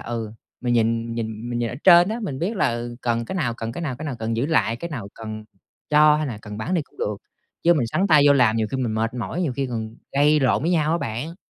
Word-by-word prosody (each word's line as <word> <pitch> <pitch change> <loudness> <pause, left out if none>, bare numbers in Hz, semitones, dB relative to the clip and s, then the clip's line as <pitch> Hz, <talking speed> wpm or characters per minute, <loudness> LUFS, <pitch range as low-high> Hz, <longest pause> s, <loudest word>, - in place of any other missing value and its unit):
ừ, 115 -2 -4 0.3
mình 120 -1 0
nhìn 115 0 +1
nhìn 110 0 -5
mình 120 - -2
nhìn 120 - -1
ở - - -6
trên 175 0 +8
á, 225 +2 -3
mình 140 -10 -4
biết 190 +9 -2
là, - - +2
ừ, 120 0 -5
cần 115 -1 0
cái 190 - -6
nào, 120 -11 -1
cần 115 0 -5
cái 170 - -6
nào, 135 -7 -3
cái 155 - -7
nào 135 -4 -4
cần 115 0 -2
giữ 125 +5 0
lại, 115 -8 +1
cái 170 +8 -6
nào 115 -10 -5
cần 110 -1 -7 0.5
cho 150 0 +6
hay 155 0 -1
là 120 -6 -5
cần 105 -1 -8
bán 180 +11 -2
đi 170 - +1
cũng 255 - -26
được. 470 - -2 0.5
Chứ 175 +1 +5
mình 125 -7 +1
sắn 185 +12 0
tay 155 -6 +6
vô 145 - +7
làm 125 -5 +3
nhiều 110 -1 +1
khi 135 - -2
mình 120 -4 -1
mệt 115 +2 -1
mỏi, 145 +8 -3
nhiều 155 -7 -1
khi 135 +2 -2
còn 115 -2 -5 0.2
gây 150 +2 +4
lộn 130 0 +2
với 165 - +1
nhau 160 -3 +2
á 170 - +1
bạn. 125 +9 -4
125 Hz, 285 wpm, -23 LUFS, 115-155 Hz, 0.5 s, trên